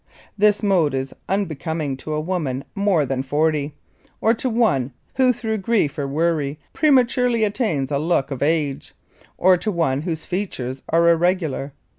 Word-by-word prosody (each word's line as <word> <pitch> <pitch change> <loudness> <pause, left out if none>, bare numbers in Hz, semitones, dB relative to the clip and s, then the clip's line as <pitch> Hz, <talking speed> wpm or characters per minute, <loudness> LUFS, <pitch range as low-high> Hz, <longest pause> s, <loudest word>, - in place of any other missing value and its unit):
This 210 +1 +3
mode 175 -9 +2
is 135 0 -3 0.2
unbecoming 160 -6 -2
to 155 +3 -5
a - - 0
woman 155 -6 -2
more 195 -7 +2
than 130 0 -2
forty; 150 +1 0 0.4
or, 225 - +3
to 255 +2 -2
one 180 - +1 0.2
who 260 -1 +4
through 225 -3 -3
grief 195 -8 +1
or 140 - -1
worry 150 -1 0 0.2
prematurely 250 -5 +3
attains 200 - 0
a 140 - +1
look 155 -3 0
of 135 - -4
age, 150 -2 -1 0.4
or 185 0 +5
to 215 +4 -2
one 160 -7 0
whose 160 -1 -4
features 135 -9 -4
are 170 +1 +3
irregular. 170 -5 +1
165 Hz, 155 wpm, -21 LUFS, 140-205 Hz, 0.4 s, or